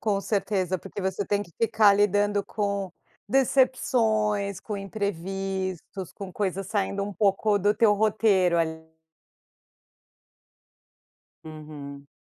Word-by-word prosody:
Com 205 Hz, -2 st, 0 dB
certeza, 195 Hz, -3 st, -1 dB
porque 195 Hz, +2 st, -8 dB
você 190 Hz, +1 st, -2 dB
tem 205 Hz, +1 st, 0 dB
que 170 Hz, -, -14 dB
ficar 215 Hz, -2 st, +5 dB
lidando 205 Hz, 0 st, +2 dB
com 200 Hz, -3 st, -2 dB, 0.4 s
decepções, 220 Hz, -6 st, +2 dB
com 210 Hz, -, -5 dB
imprevistos, 195 Hz, -2 st, -4 dB
com 195 Hz, -2 st, -8 dB
coisas 195 Hz, -1 st, -2 dB
saindo 200 Hz, -1 st, -1 dB
um 205 Hz, 0 st, -4 dB
pouco 205 Hz, +1 st, +2 dB
do 205 Hz, +2 st, +3 dB
teu 215 Hz, -3 st, +4 dB
roteiro, 200 Hz, -5 st, +3 dB
ali. 160 Hz, -1 st, -3 dB, 2.5 s
Uhum. 150 Hz, -3 st, -9 dB
200 Hz, 110 wpm, -26 LUFS, 185-210 Hz, 2.5 s, ficar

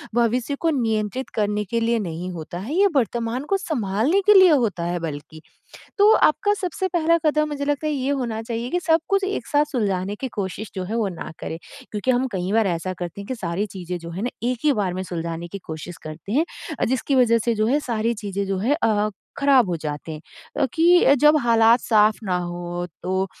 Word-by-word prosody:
भविष्य 240 Hz, +3 st, +1 dB
को 330 Hz, -, +1 dB
नियंत्रित 225 Hz, -3 st, -1 dB
करने 210 Hz, -1 st, 0 dB
के 230 Hz, +4 st, -1 dB
लिए 230 Hz, 0 st, +1 dB
नहीं 175 Hz, -2 st, -4 dB
होता 170 Hz, 0 st, -7 dB
है। 220 Hz, +10 st, -5 dB
ये 400 Hz, +2 st, +5 dB
वर्तमान 240 Hz, 0 st, 0 dB
को 390 Hz, -, +3 dB
सँभालने 275 Hz, -, 0 dB
के 420 Hz, -, +7 dB
लिए 375 Hz, -2 st, +8 dB
होता 230 Hz, -, +1 dB
है 175 Hz, +1 st, -2 dB
बल्कि, 155 Hz, -1 st, -7 dB, 0.6 s
तो 415 Hz, +2 st, +7 dB
आप 305 Hz, -, +5 dB
का 410 Hz, 0 st, +4 dB
सबसे 375 Hz, +1 st, -2 dB
पहला 335 Hz, -1 st, +2 dB
कदम 305 Hz, 0 st, +2 dB
मुझे 285 Hz, -1 st, -3 dB
लगता 290 Hz, +1 st, -1 dB
है 305 Hz, -, 0 dB
ये 270 Hz, -1 st, -1 dB
होना 240 Hz, -6 st, -2 dB
चाहिए 230 Hz, +1 st, -4 dB
कि, 355 Hz, -, 0 dB
सब 325 Hz, -1 st, +3 dB
कुछ 395 Hz, -1 st, +2 dB
एक 395 Hz, +1 st, -3 dB
साथ 290 Hz, -1 st, +3 dB
सुलझाने 200 Hz, -5 st, -1 dB
की 265 Hz, -, -2 dB
कोशिश 200 Hz, +2 st, -4 dB
जो 185 Hz, -, -3 dB
है, 205 Hz, +5 st, -4 dB
वो 220 Hz, -3 st, +1 dB
ना 180 Hz, -, -7 dB
करें। 160 Hz, -, -5 dB, 0.3 s
क्योंकि 210 Hz, +4 st, -1 dB
हम 255 Hz, +1 st, +2 dB
कई 185 Hz, 0 st, -2 dB
बार 220 Hz, -1 st, +3 dB
ऐसा 180 Hz, 0 st, -2 dB
करते 175 Hz, +2 st, -6 dB
हैं, 200 Hz, -, -8 dB
कि 260 Hz, -, -3 dB
सारी 190 Hz, -2 st, -2 dB
चीज़ें 180 Hz, -3 st, -6 dB
जो 170 Hz, 0 st, -9 dB
है 180 Hz, +4 st, -5 dB
ना 245 Hz, -, -1 dB, 0.2 s
एक 250 Hz, -1 st, -1 dB
ही 300 Hz, -, +5 dB
बार 195 Hz, -7 st, -1 dB
में 185 Hz, -, -3 dB
सुलझाने 170 Hz, -1 st, -5 dB
की 200 Hz, -, -7 dB
कोशिश 160 Hz, +2 st, -7 dB
करते 155 Hz, +5 st, -8 dB
हैं, 295 Hz, +7 st, +3 dB, 0.4 s
जिसकी 260 Hz, +3 st, 0 dB
वजह 240 Hz, -3 st, +4 dB
से 235 Hz, -, +1 dB
जो 215 Hz, 0 st, +1 dB
है 280 Hz, +6 st, +2 dB
सारी 230 Hz, +1 st, 0 dB
चीज़ें 200 Hz, 0 st, -2 dB
जो 195 Hz, -1 st, -1 dB
है 250 Hz, +10 st, +1 dB
अ, 210 Hz, -1 st, +2 dB, 0.3 s
ख़राब 275 Hz, -6 st, +4 dB
हो 175 Hz, -, -1 dB
जाते 150 Hz, +1 st, -5 dB
हैं 155 Hz, -, -7 dB, 0.4 s
अ, -, -, +5 dB
कि 340 Hz, -3 st, +5 dB
जब 300 Hz, +1 st, +6 dB
हालात 230 Hz, 0 st, +5 dB
साफ 215 Hz, -1 st, +3 dB
ना 185 Hz, -3 st, 0 dB
हो, 175 Hz, 0 st, -4 dB, 0.2 s
तो 190 Hz, +1 st, 0 dB
225 Hz, 225 wpm, -23 LUFS, 185-275 Hz, 0.6 s, लिए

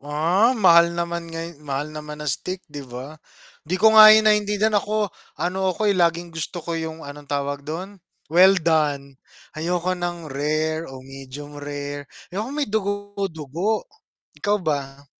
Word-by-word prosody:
Ah, 170 Hz, -, +2 dB
mahal 170 Hz, -4 st, +6 dB
naman 170 Hz, 0 st, -3 dB
ngay 165 Hz, -1 st, -7 dB
mahal 145 Hz, +1 st, -4 dB
naman 150 Hz, 0 st, -7 dB
ng 150 Hz, -, 0 dB
steak, 185 Hz, +8 st, -4 dB
'di 145 Hz, -2 st, -8 dB
ba. 130 Hz, +6 st, -8 dB, 0.5 s
'Di 180 Hz, +4 st, 0 dB
ko 220 Hz, +3 st, +5 dB
nga 215 Hz, -1 st, +11 dB
'yon 215 Hz, 0 st, +7 dB
naintindihan. 210 Hz, 0 st, +2 dB
Ako 210 Hz, 0 st, -1 dB, 0.3 s
ano 190 Hz, +2 st, -1 dB
ako, 205 Hz, +3 st, +1 dB
eh, -, -, +2 dB
laging 170 Hz, 0 st, +1 dB
gusto 165 Hz, +1 st, -4 dB
ko 170 Hz, -, -3 dB
'yong 160 Hz, -1 st, -4 dB
anong 145 Hz, 0 st, -10 dB
tawag 140 Hz, 0 st, -2 dB
do'n 185 Hz, +5 st, -6 dB, 0.3 s
well 190 Hz, +3 st, +7 dB
done. 150 Hz, -5 st, 0 dB, 0.3 s
Ayoko 175 Hz, +3 st, -1 dB
ng 175 Hz, -3 st, -4 dB
rare 155 Hz, +3 st, -1 dB
o 130 Hz, -1 st, -10 dB
medium 135 Hz, +2 st, -9 dB
rare, 145 Hz, -1 st, -6 dB, 0.2 s
ayoko 210 Hz, +5 st, -3 dB
may 300 Hz, -1 st, 0 dB
dugo-dugo. 200 Hz, -3 st, -2 dB, 0.5 s
Ikaw 205 Hz, +1 st, +1 dB
ba? 140 Hz, -4 st, -3 dB
165 Hz, 155 wpm, -23 LUFS, 145-190 Hz, 0.5 s, nga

